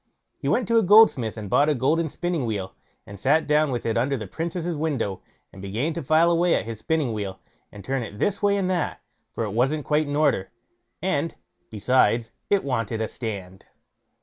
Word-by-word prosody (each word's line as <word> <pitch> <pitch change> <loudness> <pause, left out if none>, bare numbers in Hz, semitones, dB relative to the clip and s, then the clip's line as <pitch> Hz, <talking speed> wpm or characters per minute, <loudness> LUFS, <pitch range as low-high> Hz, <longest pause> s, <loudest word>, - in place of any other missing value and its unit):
He - - -4
went 245 - +1
to 230 +1 +4
a - - +3
goldsmith 190 - +5
and 105 -2 -6
bought 145 +9 +3
a 150 - +2
golden 155 +6 +1
spinning 175 -1 -2
wheel, 100 -4 -3 0.3
and 100 -1 -11
sat 150 +8 +2
down 150 0 +3
with 120 -3 -3
it 115 0 0
under 135 +3 0
the 110 - -6
Princess' 170 - -3
window, 140 -11 -2 0.3
and 95 - -11
began 110 +12 -2
to - - -4
file 160 +5 +3
away 170 +1 +3
at - - -1
his 115 -2 -6
spinning 150 -2 0
wheel, 100 -3 -5 0.3
and 100 -1 -11
to - - -16
turn 135 -1 0
it 105 -3 -7
this 200 - -1
way 200 -1 +3
and 190 -2 0
that, 180 -4 -1 0.3
for - - -3
it 105 -3 -4
wasn't 135 +6 0
quite 150 0 +1
in 145 - -3
order, 145 -11 +1 0.5
and, - - -1 0.3
besides, 115 +1 +2 0.2
it 200 -1 +2
wanted 115 -5 -2
a 110 - -1
stand. 95 -6 -7
135 Hz, 205 wpm, -24 LUFS, 110-160 Hz, 0.5 s, goldsmith